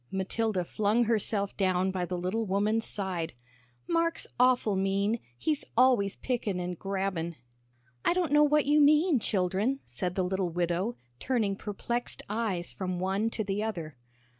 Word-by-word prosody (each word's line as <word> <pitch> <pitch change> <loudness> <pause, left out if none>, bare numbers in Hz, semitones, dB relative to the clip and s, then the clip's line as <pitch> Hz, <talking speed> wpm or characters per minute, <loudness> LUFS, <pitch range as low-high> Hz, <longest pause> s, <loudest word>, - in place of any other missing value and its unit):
Matilda 190 +1 -1
flung 215 +6 +2
herself 210 -3 0
down 185 -1 +1
by 185 -1 -2
the 180 +1 -3
little 195 +5 -1
woman's 210 +4 +1
side. 185 - -3 0.5
"Mark's 335 0 +1
awful 250 -5 +4
mean 195 +4 +1 0.2
he's 305 - -1
always 240 -6 +4
pickin' 225 -7 -2
and 180 -1 -4
grabbin'." 190 -4 -2 0.7
"I - - +3
don't 355 -5 0
know 295 0 +6
what 300 0 +3
you 295 +1 +4
mean, 300 0 +5
children," 200 +7 0
said 180 +10 -3
the 185 - +1
little 185 0 -1
widow, 175 +6 -1 0.2
turning 225 -6 0
perplexed 235 +4 -4
eyes 205 -6 -2
from 185 -2 -3
one 195 +4 0
to 225 - -3
the 200 +1 -2
other. 170 -10 -4
200 Hz, 150 wpm, -29 LUFS, 185-235 Hz, 0.7 s, know